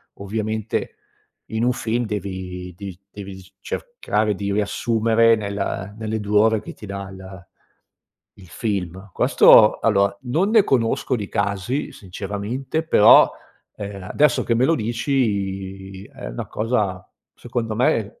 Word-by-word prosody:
ovviamente 110 +2 -3 0.6
in 110 +1 -1
un 125 - +3
film 120 0 -1
devi 95 -3 -5
devi 95 -2 -8
devi 100 -1 -8
dic 95 0 -15
cercare 110 - -2
di 100 +1 -3
riassumere 115 +2 +2
nella 100 -2 -4
nelle 110 0 -3
2 105 0 +2
ore 110 0 +3
che - - -9
ti - - -12
dà 100 -1 -6
il 95 -1 -11 0.9
il 95 - -15
film. 95 +2 -4
Questo 105 +4 +6
allora, 100 -2 +2
non 160 +11 0
ne 220 -3 +5
conosco 120 0 +1
di 105 -3 -5
casi 100 +7 -2
sinceramente, 105 - -4
però, 110 -9 +7 0.5
ehm, 100 -2 -7
adesso 150 +10 +2
che 115 - +1
me 120 +2 +2
lo 165 - +3
dici 100 -6 -2
è - - -9
una - - -6
cosa, 105 -5 -1 0.3
secondo 115 -2 -4
me 110 -3 0
105 Hz, 135 wpm, -22 LUFS, 95-115 Hz, 0.9 s, però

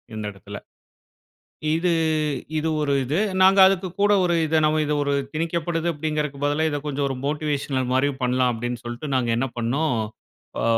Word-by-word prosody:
இந்த 110 - -4
எடத்துல. 100 +1 -10 1.2
இது 170 +1 +1 0.7
இது 160 +1 -1
ஒரு 140 -1 +1
இது. 145 +8 -1 0.2
நாங்க 190 +1 +6
அதுக்கு 190 -1 +1
கூட 205 0 +4
ஒரு 175 -1 +2
இத 160 +1 +1
நம்ம 155 0 +2
இது 150 - 0
ஒரு 140 0 0 0.2
திணிக்கப்படுது 165 +1 -1
அப்டீங்கிறதுக்கு 150 -2 -3
பதிலா 150 +2 +1
இத 145 - -2
கொஞ்சம் 140 -1 -1
ஒரு 135 - -3
மோட்டிவேஷனல் 145 -3 -1
மாரி 140 +2 +2
பண்ணலாம் 125 0 +2
அப்டீன்னு 120 +1 -4
சொல்ட்டு 120 +5 -5
நாங்க 125 -2 0
என்ன 135 +2 0
பண்னோம், 125 +3 0 0.6
அ - - -1
145 Hz, 160 wpm, -23 LUFS, 130-160 Hz, 1.2 s, நாங்க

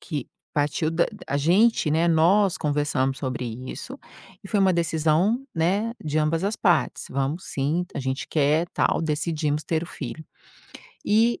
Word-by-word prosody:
que 145 -7 -5 0.3
partiu 150 +2 0
da 165 +1 +2 0.2
a 140 - 0
gente, 175 +3 +3
né, 165 +2 +2
nós 180 +4 +3
conversamos 145 -3 0
sobre 130 -2 -3 0.3
isso 265 +1 -7 0.5
e 195 - -10
foi 210 - +1
uma 190 -1 +4
decisão, 170 - +1
né, 195 +8 +1
de 155 +1 0
ambas 155 +3 +1
as 210 +3 -1
partes. 175 -3 +1
"Vamos, 140 +6 -2
sim, 150 +6 -1
a - - -2
gente 130 0 -3
quer, 155 +3 +2
tal", - - +2
decidimos 155 -1 -1
ter 160 +2 -1
o - - -10
filho, 150 -1 -7 0.8
e 225 +3 +3
160 Hz, 160 wpm, -24 LUFS, 145-180 Hz, 0.8 s, uma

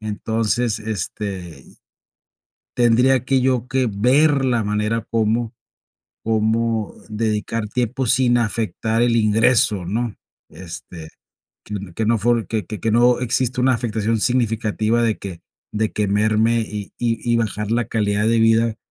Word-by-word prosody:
Entonces, 110 +2 -1
este 95 -6 -5 1.1
tendría 125 +2 +3
que 135 0 +2
yo 125 -2 0
que 130 -2 +1
ver 135 +7 +3
la 120 -4 +1
manera 105 +2 -1
cómo 115 +1 0 0.7
cómo 110 0 0 0.2
dedicar 110 0 -2
tiempo 125 +3 -2
sin 125 0 +3
afectar 115 0 0
el 120 -1 +2
ingreso, 110 -3 +3
¿no? 115 +3 -2 0.3
Este, 85 -2 -9 0.9
que 110 +3 -2
no 115 0 +3
fue 115 0 +1
que 110 +2 -2
que 110 +1 -3
no 120 +2 +3
exista 125 +1 0
una 130 0 +3
afectación 115 -1 -1
significativa 115 -1 0
de 115 -2 0
que 95 -4 -8 0.3
de 110 0 0
que 105 -1 -1
merme, 110 +3 +2
y 105 -2 -6
y 115 -2 -1
y 120 - +3
bajar 105 -2 -2
la 120 -1 +1
calidad 105 -2 0
de 115 +1 +3
vida 115 0 +3
115 Hz, 135 wpm, -20 LUFS, 105-120 Hz, 1.1 s, tendría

